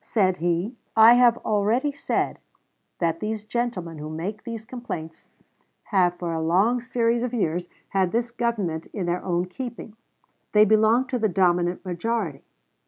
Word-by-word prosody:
Said 185 -5 +1
he: 175 +6 -1 0.2
I 225 +1 +9
have 245 -1 +5
already 220 +7 +1
said 280 - -2 0.6
that 165 -1 0
these 215 +1 -3
gentlemen 215 -9 -3
who 150 +1 -6
make 180 +7 -5
these 230 -2 -6
complaints 220 -11 -7 0.5
have 180 -4 +2
for 170 -2 -3
a 160 - -2
long 195 +10 +2
series 235 -1 0
of 250 0 -2
years 175 -4 -1 0.2
had 190 -2 +1
this 235 +1 -1
Government 215 -10 -2
in 195 -4 -3
their 175 +1 -1
own 175 -1 0
keeping. 235 +1 -7 0.6
They 210 0 +7
belong 220 +4 +4
to 250 - -1
the 220 -1 +2
dominant 180 0 +1
majority.... 180 -4 -2
210 Hz, 155 wpm, -24 LUFS, 175-235 Hz, 0.6 s, I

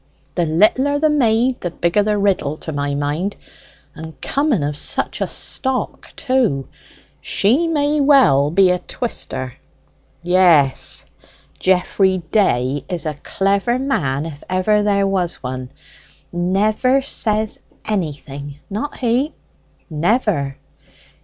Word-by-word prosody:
"The 175 -2 0
littler 235 - +3
the 310 +1 +2
maid, 245 -2 +2
the 175 - -2
bigger 170 +4 +1
the 210 0 +1
riddle, 190 -7 0
to 160 - -7
my 145 -1 -2
mind. 150 +8 -2 0.6
And 160 -3 -10
coming 280 - 0
of 145 0 -2
such - - -1
a - - +1
stock, 265 -1 -3
too, 245 - 0 0.5
she 265 +12 +2
may 295 -2 +1
well 260 - +5
be 185 +3 +4
a 180 - 0
twister." 130 - -3 0.7
"Yes; 170 -6 +3 0.5
Geoffrey 190 +1 +2
Day 140 - +1
is 175 -2 -2
a 155 - -1
clever 195 - 0
man 155 - -1
if 150 -3 -8
ever 185 +3 +2
there 200 -1 +2
was 185 -3 0
one. 130 0 -5 0.6
Never 210 +9 +1
says 215 -5 -1 0.3
anything: 145 -7 -4
not 220 +9 -4
he." 255 +5 0 0.5
"Never." 160 - 0
190 Hz, 120 wpm, -19 LUFS, 150-235 Hz, 0.7 s, well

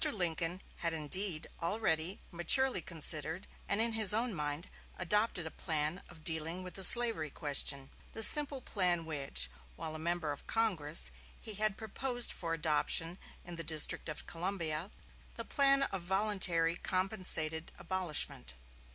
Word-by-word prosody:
Lincoln 175 -1 -3
had 170 -1 -1
indeed 160 +2 -1 0.2
already 170 -1 -2
maturely 245 +6 +3
considered 160 +1 +1 0.2
and 200 - 0
in 230 0 +3
his 215 -2 +5
own 235 0 0
mind 150 0 -5 0.3
adopted 210 -1 -1
a 160 - -7
plan 155 +1 -2
of 160 -3 -17
dealing 165 +3 -1
with 180 - -8
the 190 - -5
slavery 225 -7 +8
question: 140 -2 0 0.2
the 225 - 0
simple 285 +2 +4
plan 180 -7 -1
which, 135 - -1 0.3
while 155 - -7
a 155 - -8
member 170 -1 -3
of 145 - -10
Congress, 160 - 0 0.3
he 220 - -3
had 210 -1 -1
proposed 245 +3 -3
for 165 -1 -4
adoption 165 +2 -1 0.3
in 175 -1 -10
the 165 - -5
District 155 0 +1
of 155 - -8
Columbia 170 -1 -3 0.5
the - - -6
plan 275 -1 +2
of 195 -8 -4
voluntary 185 -3 +1
compensated 185 -4 0
abolishment. 170 - -3
175 Hz, 145 wpm, -32 LUFS, 160-205 Hz, 0.5 s, slavery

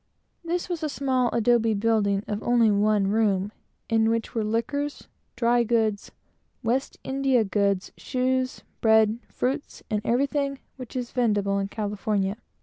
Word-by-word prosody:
This 345 +1 -2
was 350 -3 -3
a 310 - -1
small 260 -3 +1
mud 230 -2 +2
building, 205 -3 +2
of 210 0 -3
only 235 -2 +3
one 205 0 +2
room, 205 -1 +1 0.4
in 225 0 +3
which 230 0 -1
were 225 - 0
liquors, 285 +7 -2 0.3
dry 240 0 +3
and 220 -3 +1 0.5
West 250 +4 -1
India 265 -3 +2
goods, 200 -2 0
shoes, 255 0 -1 0.2
bread, 220 0 +4
fruits, 270 +4 -3
and 210 -1 0
everything 275 +3 0 0.2
which 255 -2 -10
is 245 -2 -3
vendible 205 -5 +1
in 195 - -2
California. 205 -1 -2
225 Hz, 140 wpm, -25 LUFS, 210-255 Hz, 0.5 s, bread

